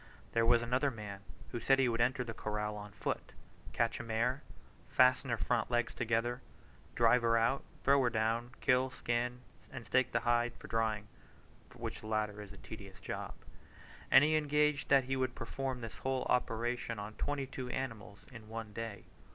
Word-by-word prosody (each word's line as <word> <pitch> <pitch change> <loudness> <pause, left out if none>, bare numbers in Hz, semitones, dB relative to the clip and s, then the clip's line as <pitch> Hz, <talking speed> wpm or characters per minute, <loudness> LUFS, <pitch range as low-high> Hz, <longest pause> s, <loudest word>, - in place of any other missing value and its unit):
There 115 0 +2
was 120 0 +5
another 125 +4 +2
man 105 -5 -7 0.3
who 120 - -3
said 135 +3 +4
he 135 -1 +4
would 115 -1 +1
enter 125 +2 +2
the 115 -2 -6
corral 105 -1 -3
on 105 0 -8
foot, 100 - -4 0.4
catch 115 -1 0
a - - -4
mare, 120 +4 0 0.5
fasten 130 +1 +4
her 115 - +1
front 120 +1 0
legs 120 -1 +1
together, 120 +1 0 0.5
drive 120 +1 +5
her 115 0 +3
out, 115 +4 +2 0.2
throw 140 0 +5
her 125 - +3
down, 115 +1 0
kill, 130 0 +3
skin, 125 0 -2 0.3
and 125 -4 -7
stake 130 -1 +2
the 115 - +1
hide 120 0 +2
for - - -11
drying 110 -2 0 0.7
(which - - -5
latter 110 -1 -2
is 105 -1 -10
a 100 - -12
tedious 100 -4 -10
job); - - -5 0.7
and - - +8
he 155 +1 +3
engaged 150 -1 +2
that 135 -1 +6
he 135 +1 -1
would 130 -1 -1
perform 130 +2 -4
this 115 0 -7
whole 130 0 -1
operation 120 -1 0
on 105 +1 -6
twenty 145 +3 -2
two 130 -1 -6
animals 115 -6 -5
in 110 -3 -11
one 110 -1 -6
day. 115 -2 -5
120 Hz, 180 wpm, -34 LUFS, 110-130 Hz, 0.7 s, and